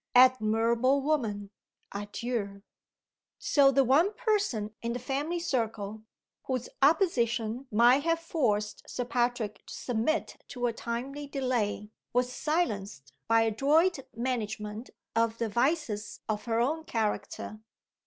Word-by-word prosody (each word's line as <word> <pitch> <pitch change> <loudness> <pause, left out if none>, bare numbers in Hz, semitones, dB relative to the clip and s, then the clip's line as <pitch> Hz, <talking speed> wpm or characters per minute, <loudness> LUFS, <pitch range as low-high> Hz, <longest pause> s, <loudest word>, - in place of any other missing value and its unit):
Admirable 245 +1 +4
woman 225 -9 -1 0.4
adieu!" 205 0 -4 0.7
So 280 -2 +4
the 275 0 +4
one 315 - +3
person 400 - 0
in 235 0 -2
the - - -2
family 280 +7 -2
circle, 220 -9 -2 0.4
whose 255 -2 -2
opposition 250 - +2
might 240 +5 +5
have 330 +2 +1
forced 230 -11 -1
Sir 245 - -3
Patrick 240 -3 -1
to - - -8
submit 245 +7 -1
to 245 -2 -3
a 235 - +1
timely 260 +6 -4
delay, 240 -6 -1 0.2
was 250 +1 +1
silenced 210 - -2
by 225 0 +5
adroit 285 - +3 0.2
management 225 -2 -3 0.3
of 230 0 +2
the 230 -1 -1
vices 235 -3 -1
of 210 -1 -2
her 230 -1 0
own 305 +7 0
character. 215 -2 -3
240 Hz, 120 wpm, -29 LUFS, 215-275 Hz, 0.7 s, might